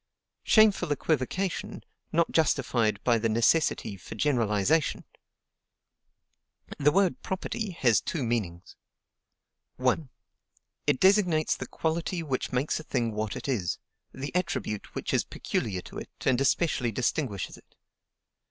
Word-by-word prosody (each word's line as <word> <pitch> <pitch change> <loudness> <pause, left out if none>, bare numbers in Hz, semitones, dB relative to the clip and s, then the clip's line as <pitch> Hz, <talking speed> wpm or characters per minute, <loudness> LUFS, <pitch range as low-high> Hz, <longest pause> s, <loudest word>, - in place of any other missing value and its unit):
Shameful 210 -7 +4
equivocation, 160 +6 -1 0.3
not 170 +1 +2
justified 120 -9 +2
by 120 -2 +3
the 115 +1 0
necessity 115 -2 +2
for 95 - -10
generalization! 120 +3 +1 1.7
The 150 +1 +4
word 195 0 +2
PROPERTY 190 +2 -3
has 120 -4 +4
two 150 - -3
meanings: 100 -8 -3 1.0
1. 130 +3 0 0.8
It 145 -3 +3
designates 185 -5 +4
the - - -6
quality 165 +2 -2
which 135 -5 -2
makes 130 +5 0
a - - -8
thing 120 -6 -1
what 105 -1 -3
it - - -6
is; 105 -11 -1 0.3
the 135 +2 -6
attribute 170 - -2
which - - -3
is - - +3
peculiar 95 -5 -3
to - - -8
it, - - -9 0.2
and 130 -1 +3
especially 135 -4 +1
distinguishes 120 - -2
it. - - -21
135 Hz, 125 wpm, -28 LUFS, 115-165 Hz, 1.7 s, Shameful